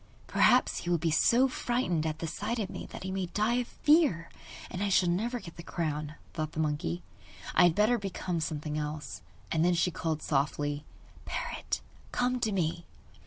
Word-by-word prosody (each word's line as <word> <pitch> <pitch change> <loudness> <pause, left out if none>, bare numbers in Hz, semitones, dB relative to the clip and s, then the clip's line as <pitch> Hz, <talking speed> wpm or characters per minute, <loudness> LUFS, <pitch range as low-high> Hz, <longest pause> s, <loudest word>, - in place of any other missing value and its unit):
'Perhaps - - +4
he 175 - -4
will 175 - +3
be 165 0 0
so 240 - +5
frightened 240 -11 0
at 155 0 -2
the 165 - -4
sight 210 +8 -2
of 210 -4 -2
me - - -6
that - - -8
he 190 - -3
may 190 -1 -1
die 215 +7 +1
of 245 -1 -1
fear, 295 - +3 0.4
and 185 - -4
I 205 - +1
shall 185 -2 +4
never 230 +8 0
get 170 -6 -11
the - - -6
crown,' 155 -3 -3 0.2
thought 155 -1 -3
the - - -4
monkey. 145 - -1 0.5
'I - - +6
had 170 -2 +4
better 225 +3 +4
become 185 -3 -3
something 155 -1 -2
else.' 150 -7 -5 0.3
And 170 +2 +3
she 180 - +2
called 160 -2 -2
softly: 145 +1 0 0.4
'Parrot, 485 -1 -3 0.3
come 250 0 +1
to 220 -3 0
me! 170 -3 -1
175 Hz, 185 wpm, -30 LUFS, 155-210 Hz, 0.5 s, I